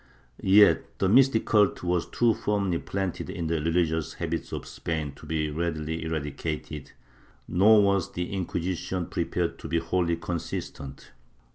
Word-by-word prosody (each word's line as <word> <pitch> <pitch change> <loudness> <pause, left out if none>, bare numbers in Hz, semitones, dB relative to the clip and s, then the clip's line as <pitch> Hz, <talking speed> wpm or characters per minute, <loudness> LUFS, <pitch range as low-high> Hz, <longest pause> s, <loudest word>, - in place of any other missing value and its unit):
^ - - -30 0.4
Yet 100 +2 +5
the 95 - +1
mystic 125 +2 +4
cult 105 -4 +3
was 90 -1 0
too 120 -1 +3
firmly 100 -6 0
planted 95 -2 -3
in 85 - -4
the 80 -1 0
religious 80 0 0
habits 85 -1 -3
of - - -5
Spain 80 -3 -4
to 70 +3 -14
be 75 -1 -1
readily 80 0 -2
eradicated, 75 -1 -4 0.5
nor 105 +4 +5
was 100 -2 +1
the 90 +2 -4
Inquisition 90 -1 -2
prepared - - -2
to - - -7
be 85 - 0
wholly 85 +1 0
consistent. 80 -5 -6
85 Hz, 145 wpm, -27 LUFS, 80-95 Hz, 0.5 s, Yet